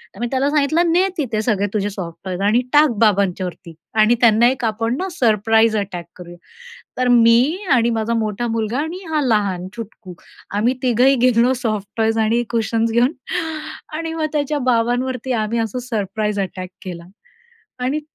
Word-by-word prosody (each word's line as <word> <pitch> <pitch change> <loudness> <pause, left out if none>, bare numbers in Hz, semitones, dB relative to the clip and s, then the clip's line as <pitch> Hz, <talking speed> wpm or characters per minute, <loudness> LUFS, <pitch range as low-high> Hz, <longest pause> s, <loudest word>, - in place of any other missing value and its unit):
तर - - -13
मी 240 - -1
त्याला 270 +1 +1
सांगितलं, 300 +2 +2
ने 360 +3 +3
तिथे 235 -8 -1
सगळे 210 -3 +1
तुझे 205 -1 0
सॉफ्टटॉयज 180 0 -6
आणि 215 +5 +3
टाक 300 +1 +6
बाबांच्यावरती 190 -5 0 0.3
आणि 220 +3 +4
त्यांना 230 0 +5
1 260 -1 -4
आपण 225 +2 -1
ना, 375 - -2
सरप्राईज 225 - +2
अटॅक 185 -4 -4
करूया. 175 -1 -11 0.6
तर 255 0 +1
मी 240 +6 +5 0.2
आणि 235 -2 +3
माझा 225 +1 -1
मोठा 220 0 -1
मुलगा 225 +2 -2
आणि 320 +4 -4
हा 310 -1 +1
लहान 200 -7 0
चुटकू, 225 -5 -9 0.4
आम्ही 235 +5 +2
तिघंही 255 +2 +4
गेलो 245 +1 +3
सॉफ्टटॉयज 220 0 -1
आणि 225 +2 +2
कुशन्स 230 0 0
घेऊन 240 +4 +3 0.8
आणि 325 0 -4
मग, 320 -1 -1
त्याच्या 295 0 -1
बाबांवरती 245 +2 0
आम्ही 220 +2 -2
असं 225 +1 -2
सरप्राईज 210 -1 -2
अटॅक 185 -1 -5
केला. 175 -2 -7 0.7
आणि 260 +5 -1
230 Hz, 155 wpm, -19 LUFS, 210-255 Hz, 0.8 s, टाक